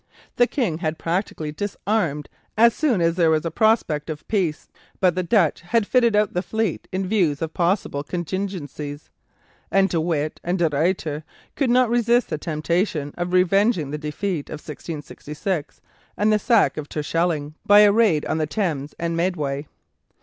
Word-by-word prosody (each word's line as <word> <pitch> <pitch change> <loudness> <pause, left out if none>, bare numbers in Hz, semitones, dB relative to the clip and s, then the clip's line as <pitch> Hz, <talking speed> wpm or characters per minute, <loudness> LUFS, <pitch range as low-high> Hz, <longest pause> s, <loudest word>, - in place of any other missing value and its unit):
The 245 - +5
King 210 - -1
had 160 -2 -2
practically 165 -3 -2
disarmed 180 -3 -2 0.3
as 235 +1 +6
soon 255 - +1
as 165 0 +3
there 170 -2 +4
was 155 0 +1
a 165 - -2
prospect 170 -7 +1
of 155 -1 -6
peace. 185 -8 -1 0.3
But 185 -2 +3
the 185 - -1
Dutch 180 -4 +2
had 205 +6 +1
fitted 235 -1 +3
out 210 -1 +2
the 180 - 0
fleet 220 -3 -2
in 190 +1 -2
view 185 -7 +2
of 165 -1 -4
possible 175 -5 0
contingencies, 170 -4 -5 0.6
and 195 0 +3
De 165 - 0
Witt 155 -2 -1
and 175 +2 0
De 170 -2 +2
Ruyter 155 0 -1 0.3
could 275 -4 +1
not 250 +1 +4
resist 240 +1 +2
the 155 - -2
temptation 155 -1 -1
of 175 0 -3
revenging 185 - +2
the 150 - -4
defeat 155 +2 -3
of - - -6
1666 150 +2 -6 0.4
and 215 +1 +3
the 210 - +3
sack 230 -4 +3
of 150 -1 -5
Terschelling 155 -1 -1
by 205 +1 +7
a 205 -1 +7
raid 200 -8 +3
on 160 - -1
the 155 - 0
Thames 155 -7 -2
and 170 0 -2
Medway. 150 -5 -1
175 Hz, 170 wpm, -23 LUFS, 155-205 Hz, 0.6 s, by